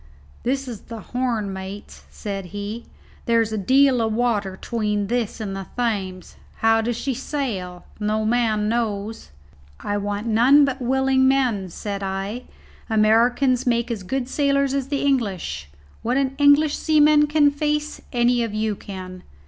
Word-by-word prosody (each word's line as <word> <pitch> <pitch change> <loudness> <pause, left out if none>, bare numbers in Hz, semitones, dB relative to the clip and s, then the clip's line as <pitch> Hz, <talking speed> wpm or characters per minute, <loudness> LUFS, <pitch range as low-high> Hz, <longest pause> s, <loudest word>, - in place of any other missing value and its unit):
"This 270 +2 -1
is 230 -5 -7
the 230 -1 -6
Horn, 230 -3 -2
mates," 190 +2 -8
said 195 -2 -5
he. 205 +5 -6 0.4
"There's 230 -1 +2
a - - -1
deal 260 +3 +4
o' 225 - +1
water 215 -4 0
'tween 210 -3 -1
this 235 +1 -2
and 200 -3 -4
the 195 -1 -6
Thames. 195 -7 -3 0.2
How 225 0 +3
do 235 +2 -1
she 240 +3 -2
sail? 230 -10 -4
no 215 +1 0
man 220 -2 +1
knows." 220 - -2 0.5
"I 205 - -2
want 205 +1 -3
none 245 +6 +5
but 270 -1 -3
willing 265 +1 +2
men," 245 -8 +1
said 200 +3 -5
I. 195 +5 -4 0.4
"Americans 240 +4 +3
make 235 0 +1
as 220 -4 -3
good 245 +7 -3
sailors 280 0 +1
as 275 -2 -1
the 280 -1 -2
English. 200 - -1 0.3
What 245 +3 0
an 270 -1 +1
English 285 +1 +5
seaman 300 -1 +4
can 295 -1 +4
face 300 +1 -2
any 240 -1 +2
of 225 -3 -2
you 215 -1 0
can. 185 -2 -8
230 Hz, 155 wpm, -22 LUFS, 205-265 Hz, 0.5 s, none